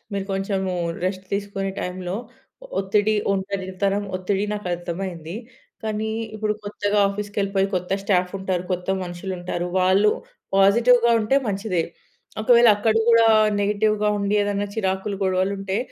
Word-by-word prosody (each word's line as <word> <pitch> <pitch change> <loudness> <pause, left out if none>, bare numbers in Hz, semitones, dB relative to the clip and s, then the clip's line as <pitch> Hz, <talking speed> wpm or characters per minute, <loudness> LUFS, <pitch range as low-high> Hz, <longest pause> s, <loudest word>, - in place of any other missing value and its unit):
మీరు 200 -1 -2
కొంచెము 195 -1 -1 0.3
రెస్ట్ 185 0 -2
తీసుకునే 200 -1 -2
టైంలో, 180 +1 -4 0.5
ఒ - - -8
ఒత్తిడి, 205 +2 +2 0.2
ఒంటరితనం, 195 +1 -2
ఒత్తిడి 190 +2 -1
నాకర్థమైంది. 175 -2 -4 0.5
కానీ, 220 0 -2 0.2
ఇప్పుడు 215 0 0
కొత్తగా 205 0 -1
ఆఫీస్‌కెళ్ళిపోయి, 200 -1 -1
కొత్త 180 +1 -2
స్టాఫుంటారు, 185 -1 0
కొత్త 180 0 -4 0.2
మనుషులుంటారు, 175 0 -4
వాళ్ళు 190 +3 +4 0.5
పాజిటివ్‌గా 235 +4 +5
ఉంటే, 215 +6 +2
మంచిదే. 195 -3 -1 0.6
ఒకవేళ 235 +1 +6
అక్కడ 220 +1 +1
గూడా 230 -1 +6 0.3
నెగెటివ్‌గా 210 +1 +1
ఉండి, 200 +1 0
ఏదన్నా 205 0 -1
చిరాకులు, 195 -1 -1
గొడవలుంటే, 190 +1 0
195 Hz, 115 wpm, -23 LUFS, 185-210 Hz, 0.6 s, ఒకవేళ